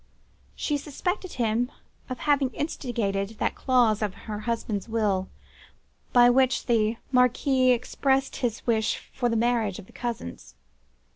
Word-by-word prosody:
She 295 - -1
suspected 355 +6 -3
him 235 +1 0 0.4
of 255 - -3
having 285 -3 +2
instigated 225 -8 -2
that - - 0
clause 240 -5 +2
in 210 -2 0
her 210 +2 -7
husband's 225 -2 -2
will, 205 -4 0 0.8
by 245 -1 +7
which 255 0 +3
the 225 -2 +2
Marquis 255 +1 +3
expressed 265 +2 +1
his 240 -4 -2
wish 220 -2 +1 0.2
for 245 - 0
the 230 - 0
marriage 225 -4 +1
of 210 - -10
the - - -19
cousins. 85 - -6
240 Hz, 135 wpm, -26 LUFS, 215-255 Hz, 0.8 s, by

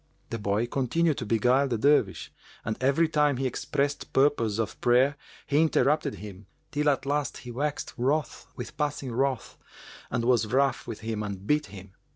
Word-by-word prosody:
The 115 - -3
boy 105 +2 0
continued 140 +5 0
to 115 - -5
beguile 125 +5 +3
the 120 -3 -1
Dervish 130 -6 +2 0.3
and 110 - -1
every 140 +5 +3
time 150 -4 +2
he 135 - -1
expressed 140 +3 -2
purpose 135 -6 +2
of 115 -3 -3
prayer, 125 +4 +4 0.3
he 145 +2 +2
interrupted 150 -2 +2
him, 100 -1 -10 0.2
till 150 0 +2
at 135 -2 0
last 145 +1 -1
he 120 - -6
waxed 145 +4 -3
wroth 135 +2 -1
with 140 +5 -8
passing 145 -3 -2
wrath 130 -1 -1 0.5
and 115 0 -1
was 120 -3 +3
rough 135 +4 +1
with 115 -2 -6
him 110 -1 -3
and 100 -2 -5
beat 150 +5 +1
him. 100 -1 -11
130 Hz, 175 wpm, -27 LUFS, 115-145 Hz, 0.5 s, prayer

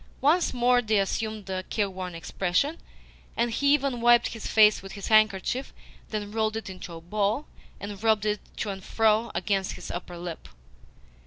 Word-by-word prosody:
Once 325 +6 +3
more 245 0 +3
they 220 -2 +1
assumed 215 +1 -2
a 190 -1 -2
careworn 185 -3 -3
expression, 190 - -1 0.6
and 235 0 +1
he 280 +5 +2
even 275 -4 +1
wiped 240 0 +5
his 225 - -6
face 215 -1 +5
with 195 0 -9
his 200 -2 -6
handkerchief, 215 +4 +2 0.4
then 205 -1 -4
rolled 220 0 0
it 220 -3 -6
into 185 -2 -9
a - - -8
ball, 210 - -1 0.3
and 200 -1 -7
rubbed 220 -2 +2
it 210 -1 0 0.2
to 210 - -2
and 190 -1 -8
fro 220 +2 +2
against 190 +2 0
his - - -8
upper 175 0 -6
lip. 170 -1 -7
215 Hz, 170 wpm, -27 LUFS, 190-230 Hz, 0.6 s, wiped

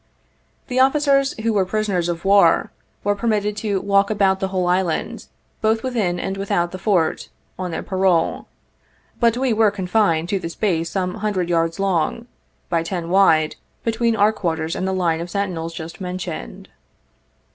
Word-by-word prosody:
The 255 0 -1
officers 275 0 +3
who 225 0 +1
were 200 -2 +3
prisoners 185 -3 -1
of 170 +1 -4
war, 195 -4 +4 0.3
were 205 - +2
permitted 210 -1 -1
to 205 -3 -1
walk 200 +1 +2
about 195 -3 +2
the 190 - -1
whole 185 -1 -1
island, 180 -2 -1 0.3
both 220 +1 +1
within 215 -9 -1
and 195 - -3
without 175 -3 -1
the 185 - -7
Fort, 185 -4 0 0.3
on 185 -1 -3
their 165 - -4
parole; 185 -4 +1 0.7
but 235 -1 +3
we 260 -2 +1
were 220 -1 +4
confined 190 -4 +1
to 195 - 0
the 165 - -5
space 165 -2 -1
some 180 -2 -2
hundred 190 -5 -1
yards 165 +1 0
long, 195 +3 0 0.4
by 170 -1 +1
ten 170 0 -4
wide, 160 -5 +3 0.3
between 230 0 +1
our 210 +1 +3
quarters 160 -4 -2
and 185 - -2
the - - 0
line 170 -3 0
of 175 - -6
sentinels 175 -4 -3
just 165 +2 -8
mentioned. 180 - -6
190 Hz, 165 wpm, -21 LUFS, 170-210 Hz, 0.7 s, war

